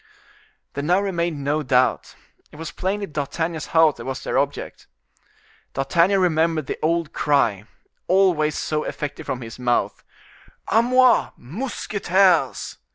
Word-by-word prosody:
There 140 - -4
now 175 +5 +3
remained 170 -6 -2
no 150 +2 0
doubt, 130 -2 +1 0.4
it - - -15
was 160 +1 -7
plainly 200 +2 -2
D'Artagnan's 160 +1 -3
house 160 -2 +4
that - - -9
was 130 0 -5
their - - -3
object. - - -4 0.9
D'Artagnan 170 +8 +2
remembered 160 -3 +1
the - - -5
old 165 0 0
cry, 115 -9 +1 0.4
always 175 -5 +2
so 155 0 -2
effective 145 -1 -6
from 130 - -3
his 115 +1 -9
mouth: 120 -1 0 0.7
"A 225 - +4
moi! 255 +1 +4
mousquetaires!" 190 - 0
160 Hz, 130 wpm, -22 LUFS, 140-185 Hz, 0.9 s, house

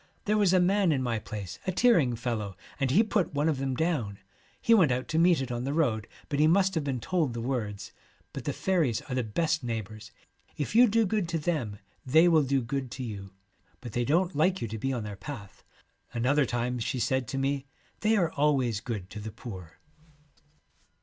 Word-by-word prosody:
There 210 - +2
was 200 -4 +4
a 185 - +5
man 190 0 +3
in 135 -3 +1
my 115 -3 -1
place, 105 -4 -7
a - - +2
tearing 175 - +3
fellow, 110 -5 -3 0.2
and 135 -2 +1
he 185 - +5
put 205 -8 0
one 145 +2 +2
of 150 -4 +1
them 135 -1 -1
down. 130 - -1 0.4
He 230 - +3
went 175 - +5
out 125 +1 -1
to 160 - +1
meet 170 -4 +4
it 130 -1 -4
on 120 0 -2
the 140 +3 -2
road, 115 -10 +1 0.2
but 145 - -2
he 155 - +5
must 190 +3 +3
have 160 -4 -1
been 135 -3 -2
told 155 -2 -1
the - - -3
words. 105 -5 -3 0.4
But - - -6
the - - 0
faeries 165 - 0
are 130 - -6
the 125 - +1
best 160 +8 0
neighbours. 110 -2 -5 0.5
If 145 - -3
you 245 +2 +7
do 225 +1 +3
good 200 -3 -1
to 170 - 0
them 150 -11 -2 0.3
they 160 +6 +5
will 165 -3 +5
do 135 -2 +1
good 130 +2 -3
to 130 - -5
you, 100 -4 -6 0.5
but 120 - -8
they 120 - +1
don't 170 +8 +1
like 180 +5 +2
you 115 - -3
to 110 +1 -5
be 135 +5 -1
on 120 -4 -2
their 105 -1 -6
path.' 105 - -9 0.5
Another 135 +4 +2
time 120 +1 -1
she 115 +3 -2
said 130 0 0
to 135 - -4
me, 135 +1 -1
' 125 - -36
They 220 +1 +3
are 175 -5 +2
always 135 -7 +1
good 105 -5 -5
to 105 - -7
the 110 +1 -6
poor.' 95 -7 -9
135 Hz, 220 wpm, -28 LUFS, 115-165 Hz, 0.5 s, you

